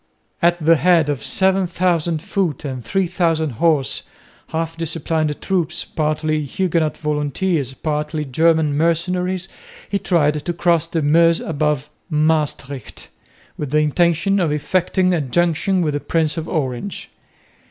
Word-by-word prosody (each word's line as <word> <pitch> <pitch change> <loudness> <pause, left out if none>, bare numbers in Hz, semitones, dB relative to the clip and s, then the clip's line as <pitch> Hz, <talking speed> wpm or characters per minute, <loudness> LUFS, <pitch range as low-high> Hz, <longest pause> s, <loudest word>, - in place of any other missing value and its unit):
At 175 0 +4
the 165 0 +4
head 170 -2 +3
of 145 -3 -1
7000 175 -4 +1
foot 185 - -2
and 130 -3 -5
3000 170 - 0
horse 145 +2 +1 0.5
half 165 0 -3
disciplined 160 -2 -1
troops, 175 -3 -1
partly 155 0 -1
Huguenot 165 -1 -1
volunteers, 150 -1 -1
partly 150 0 -2
German 160 +2 +2
mercenaries 180 +3 0 0.4
he 200 - +1
tried 150 -5 +1
to 175 - -2
cross 170 -1 +2
the 165 -2 -1
Meuse 165 +3 +4
above 150 -2 -1 0.2
Maestricht 150 -4 -1 0.5
with 150 - -3
the 150 - +1
intention 170 +5 +2
of 170 -5 +1
effecting 185 +4 +1
a 170 - +1
junction 175 +6 +1
with 150 -2 0
the 145 - -1
Prince 160 0 0
of 165 -1 -4
Orange. 140 +4 -3
160 Hz, 130 wpm, -20 LUFS, 150-175 Hz, 0.5 s, At